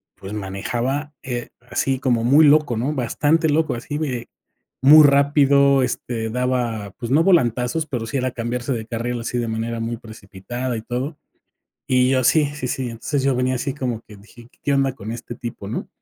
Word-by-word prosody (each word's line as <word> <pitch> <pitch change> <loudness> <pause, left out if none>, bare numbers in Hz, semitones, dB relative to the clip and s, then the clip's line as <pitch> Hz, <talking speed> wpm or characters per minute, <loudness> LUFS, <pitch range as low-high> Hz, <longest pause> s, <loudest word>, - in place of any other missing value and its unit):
pues, 100 +1 -9
manejaba, 120 +9 -3
eh, 120 -2 -4 0.2
así 135 -1 0
como 120 -4 +1
muy 145 +6 +6
loco, 145 -5 +4
¿no?, 130 +7 -1
bastante 150 +5 +1
loco, 155 +2 +1
así 145 +5 -5
de 130 -6 -3 0.5
muy 150 +4 +9
rápido. 140 -1 +4
Este, 115 -3 -3
daba, 120 -4 -1
pues 120 - -5
no 155 +4 +4
volantazos, 130 - +2
pero 125 -5 -3
sí 140 - -2
era 130 0 -1
cambiarse 125 +2 -3
de 110 -2 -4
carril 120 +1 -3
así 120 +1 -3
de 120 - -2
manera 115 +1 -3
muy 115 +1 -2
precipitada 115 +3 -6
y - - -5
todo. 130 +6 -4 0.7
Y 125 0 +3
yo 130 -1 +2
sí, 155 +1 +4
sí, 140 -4 -4
sí, 130 +1 -2
entonces 130 +5 -2
yo 135 -2 +2
venía 130 0 +1
así 135 +2 -3
como 125 -5 -3
que 105 - -14
dije: 115 +4 -16 0.2
"¿Qué 145 - 0
onda 135 -1 +2
con 110 -2 -8
este 120 0 -7
tipo, 115 -5 -7
no?". 110 - -4
125 Hz, 185 wpm, -21 LUFS, 115-140 Hz, 0.7 s, muy